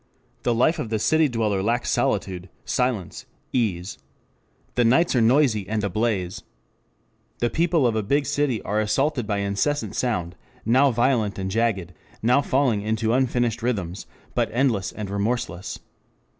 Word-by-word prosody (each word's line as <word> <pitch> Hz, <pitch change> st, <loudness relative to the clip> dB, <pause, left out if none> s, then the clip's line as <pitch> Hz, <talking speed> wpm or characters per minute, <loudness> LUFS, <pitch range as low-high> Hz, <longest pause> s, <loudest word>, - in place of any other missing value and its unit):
The 120 Hz, -, +1 dB
life 155 Hz, +8 st, +2 dB
of 125 Hz, -, -3 dB
the 110 Hz, -, 0 dB
city 155 Hz, +7 st, +3 dB
dweller 110 Hz, -5 st, 0 dB
lacks 120 Hz, +5 st, 0 dB
solitude, 90 Hz, -1 st, -1 dB, 0.2 s
silence, 125 Hz, -8 st, -2 dB, 0.3 s
ease. 95 Hz, -, -1 dB, 0.7 s
The 120 Hz, -, +2 dB
nights 135 Hz, +8 st, +3 dB
are 120 Hz, -, +4 dB
noisy 115 Hz, -5 st, +3 dB
and 110 Hz, -1 st, -1 dB
ablaze. 100 Hz, -2 st, -1 dB, 1.0 s
The 120 Hz, -1 st, 0 dB
people 165 Hz, -2 st, +2 dB
of 115 Hz, -2 st, +2 dB
a 110 Hz, -, +1 dB
big 140 Hz, +8 st, +1 dB
city 145 Hz, -5 st, 0 dB
are 105 Hz, +1 st, -1 dB
assaulted 125 Hz, +2 st, 0 dB
by 105 Hz, -1 st, 0 dB
incessant 100 Hz, +10 st, -1 dB
sound, 90 Hz, -9 st, -1 dB, 0.3 s
now 130 Hz, +5 st, +5 dB
violent 120 Hz, -4 st, +1 dB
and 95 Hz, 0 st, -3 dB
jagged, 100 Hz, -5 st, 0 dB, 0.3 s
now 125 Hz, +5 st, +4 dB
falling 130 Hz, -6 st, +1 dB
into 110 Hz, +1 st, 0 dB
unfinished 120 Hz, -2 st, +1 dB
rhythms, 100 Hz, -6 st, -3 dB, 0.3 s
but -, -, +1 dB
endless 115 Hz, -5 st, +1 dB
and 105 Hz, -2 st, -6 dB
remorseless. 100 Hz, -3 st, -2 dB
115 Hz, 145 wpm, -24 LUFS, 100-130 Hz, 1.0 s, now